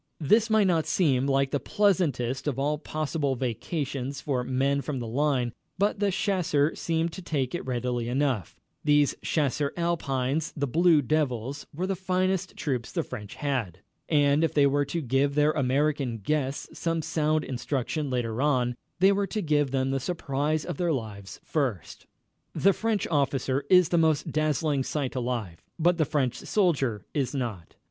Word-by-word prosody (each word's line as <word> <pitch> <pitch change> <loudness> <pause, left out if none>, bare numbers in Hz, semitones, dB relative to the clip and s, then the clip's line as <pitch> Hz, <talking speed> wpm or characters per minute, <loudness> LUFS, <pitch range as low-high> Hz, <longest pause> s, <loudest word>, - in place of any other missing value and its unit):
This 215 +9 +3
might 215 -2 +4
not 165 -4 +2
seem 135 -7 +2
like 135 0 +2
the 145 - +1
pleasantest 145 - +1
of 135 -4 -1
all 145 +2 0
possible 155 -2 -2
vacations 135 +2 -3
for 135 -4 -1
men 135 +2 +1
from 135 +1 -4
the 120 - -4
line, 125 0 0 0.2
but 200 +2 +1
the 205 -1 +2
chasseurs 180 -6 +1
seemed 165 0 0
to 190 - -7
take 140 -7 -1
to 175 - -2
it - - -9
readily 120 -1 -1
enough. 130 - 0 0.3
These 145 -1 +4
Chasseurs 145 -1 0
Alpines 155 -3 -1
the 145 - 0
Blue 160 +2 +4
Devils 140 -2 -1
were 175 +6 -3
the 195 0 -1
finest 185 0 -1
troops 125 -5 -2
the - - -1
French 105 -2 -8
had. 120 - -2 0.3
And 145 0 +3
if 165 - 0
they 145 -1 +5
were 145 +1 +2
to 165 +4 -3
give 135 +1 +1
their 150 +1 +4
American 140 -2 0
guests 135 +5 -2
some 165 -1 -1
sound 155 -1 +1
instruction 135 +3 -2
later 120 -2 -1
on, 125 -4 +2 0.2
they 190 +3 +5
were 200 0 +1
to 215 - -2
give 145 -3 +2
them 135 0 0
the 135 - 0
surprise 150 -1 -1
of - - -4
their 175 -2 +1
lives 105 -8 -5
first. 130 - -3 0.5
The 195 +1 +4
French 220 -2 -1
officer 140 -2 0
is 180 -2 +6
the 170 - +3
most 155 -3 +2
dazzling 155 -2 +1
sight 135 0 -2
alive, 120 -9 -3 0.2
but 175 +1 +2
the 155 - +4
French 140 -5 0
soldier 140 - 0
is 145 -1 -1
not. 115 -10 -4
145 Hz, 170 wpm, -27 LUFS, 130-160 Hz, 0.5 s, is